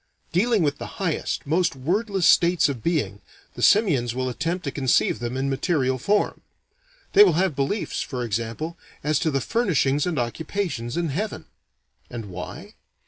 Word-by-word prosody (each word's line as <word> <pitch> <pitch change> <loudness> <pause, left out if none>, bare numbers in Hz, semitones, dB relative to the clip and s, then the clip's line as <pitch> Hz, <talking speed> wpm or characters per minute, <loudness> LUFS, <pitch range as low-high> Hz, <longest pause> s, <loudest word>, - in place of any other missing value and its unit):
Dealing 210 +2 +2
with 145 -1 0
the - - -8
highest, 180 -5 -2
most 160 +2 +1
wordless 190 - 0
states 170 -1 +5
of 135 -5 -4
being, 155 - -1 0.3
the - - -8
simians 140 - +3
will 130 0 -1
attempt 165 +8 -2
to 140 - -3
conceive 135 -3 +1
them 120 +2 -3
in 135 +1 -1
material 135 -2 0
form. 205 - +1 0.7
They 205 - +9
will 185 -5 +4
have 180 -1 +1
beliefs, 140 +10 -1
for 125 -2 -4
example, 115 +9 -3 0.2
as 150 -1 +1
to 160 - +1
the 135 -3 0
furnishings 150 - +1
and 170 -4 -1
occupations 140 - -3
in 170 -2 0
heaven. 205 +10 -3 0.6
And 115 -5 -7
why? 90 0 -8
150 Hz, 160 wpm, -24 LUFS, 130-180 Hz, 0.7 s, They